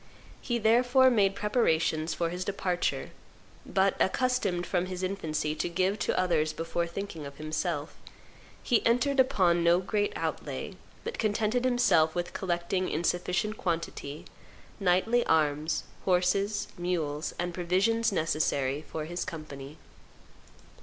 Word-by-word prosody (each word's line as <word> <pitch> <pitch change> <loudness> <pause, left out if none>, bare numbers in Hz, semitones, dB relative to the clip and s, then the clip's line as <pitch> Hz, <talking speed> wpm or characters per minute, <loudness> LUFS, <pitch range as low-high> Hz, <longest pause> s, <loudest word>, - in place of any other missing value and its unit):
He 240 - -1
therefore 245 +3 +4
made 200 -4 +3
preparations 165 -7 +1
for 170 -1 -1
his 180 +1 -3
departure; 180 -2 -1 0.6
but, 195 0 +2
accustomed 200 -6 +1
from 180 0 0
his 185 0 -5
infancy 160 -5 -2
to 155 +2 -2
give 185 +4 0
to - - 0
others 165 -4 +1
before 165 +1 -2
thinking 170 -3 -6
of 140 0 -12
himself, 155 +1 -3 0.7
he 240 -4 +2
entered 265 +4 +2
upon 185 -10 +3
no 170 +1 +5
great 205 +2 0
outlay, - - -4 0.3
but 465 - -5
contented 220 +3 +1
himself 215 -11 +3
with 175 0 -3
collecting 180 0 -1
in 160 - -2
sufficient 180 +5 0
quantity 165 -4 -3 0.5
knightly 195 +6 +3
arms, 155 0 +1 0.2
horses, 195 +3 +1
mules, 160 -4 -2
and 175 0 -2
provisions 195 +7 +1
necessary 150 -5 0
for 155 -1 -4
his 175 +2 -3
company." 150 -4 -8
180 Hz, 125 wpm, -29 LUFS, 165-210 Hz, 0.7 s, no